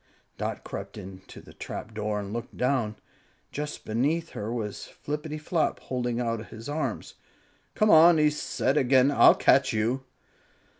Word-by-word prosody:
Dot - - -4
crept - - -7
up 95 0 -10
to - - -11
the - - -15
trapdoor 105 -1 -4
and 100 +1 -7
looked 120 0 -6
down. 125 -5 0 0.6
Just 150 +1 -5
beneath 145 +10 0
her 105 +2 -5
was 110 -4 -4 0.2
Flippityflop, 150 +2 -2
holding 125 -2 -3
out 115 -2 -2
his 110 +1 -10
arms. 150 +2 -3 0.6
"Come 215 -1 +3
on!" 165 +1 +8
he 150 -1 +4
said 145 -1 -1
again; 130 0 +4
"I'll - - +7
catch - - +3
you." 115 +5 0
125 Hz, 145 wpm, -27 LUFS, 110-150 Hz, 0.6 s, on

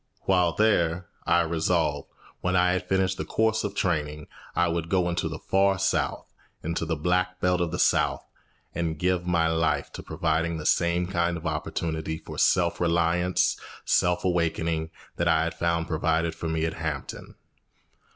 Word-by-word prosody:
While 90 -3 +2
there, 90 -5 +1 0.2
I 85 0 +4
resolved, 80 -3 0 0.3
when 90 +1 0
I 90 0 +4
had 90 0 -2
finished 95 -1 +1
the - - -1
course 110 0 +1
of 100 -1 -3
training, 75 -5 -1 0.3
I 85 - +3
would 85 -1 -2
go 90 -1 +2
into 85 -1 -1
the 80 - -5
Far 95 +3 +2
South, 95 +1 0 0.4
into 85 0 -2
the 80 - 0
Black 90 +4 0
Belt 90 -1 +1
of 85 - 0
the - - -3
South, - - +2 0.5
and 80 -2 -2
give 90 +1 0
my 85 -2 +2
life 80 0 0
to - - -7
providing 80 +1 -1
the 75 - -7
same 85 0 +2
kind 85 -2 0
of 80 - -10
opportunity 80 -1 -2
for - - -8
self 85 0 +2
reliance, 85 +1 +2 0.3
self 90 +1 +2
awakening, 85 -2 0 0.3
that 85 - 0
I 80 -1 +4
had 85 - -2
found 85 -1 0
provided 80 0 0
for 85 - -5
me 80 0 0
at 80 - -2
Hampton. 80 -4 -5
85 Hz, 170 wpm, -26 LUFS, 80-90 Hz, 0.5 s, I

